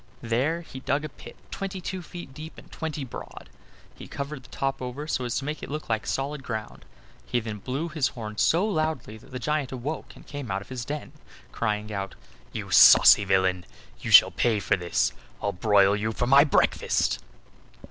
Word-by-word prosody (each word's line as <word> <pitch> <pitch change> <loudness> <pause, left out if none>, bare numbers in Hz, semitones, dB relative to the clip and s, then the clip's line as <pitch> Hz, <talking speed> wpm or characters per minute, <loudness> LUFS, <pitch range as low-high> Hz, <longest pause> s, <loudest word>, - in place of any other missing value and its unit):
There 135 +9 0
he 135 -5 -10
dug 140 +3 -1
a - - -5
pit - - -13 0.2
twenty 195 -1 -4
two 185 +1 -5
feet 175 -4 -10
deep 155 +4 -9
and - - -14
twenty 155 -2 -4
broad. 125 - -10 0.4
He - - -11
covered 140 0 -5
the 125 - -18
top 135 -1 -2
over 130 +4 -5
so 130 -5 -2
as 120 - -2
to 135 - -2
make 150 +1 -4
it - - -7
look 150 -1 -5
like 110 +1 -1
solid 140 +1 -2
ground. 110 -4 -6 0.4
He 60 - 0
then 110 -2 -6
blew 135 +9 -3
his 155 -4 0
horn 110 -3 -7
so 175 +5 +3
loudly 155 - -2
that 110 - -17
the 125 - -6
giant 145 +2 -1
awoke 135 +5 -5
and - - -15
came 145 -5 -7
out 95 +1 -2
of - - -21
his 125 -2 -5
den 150 +2 -5 0.4
crying 105 -1 -2
out: 95 -1 -4 0.4
"You - - -6
saucy 105 - +8
villain! 95 -1 +2 0.4
you - - -5
shall - - +9
pay 115 -3 +1
for 100 - +1
this 75 -8 0 0.3
I'll 100 - -1
broil 100 +1 +4
you 110 +2 -2
for 120 - -1
my 140 +3 +7
breakfast!" 145 - +1
130 Hz, 200 wpm, -26 LUFS, 105-150 Hz, 0.4 s, shall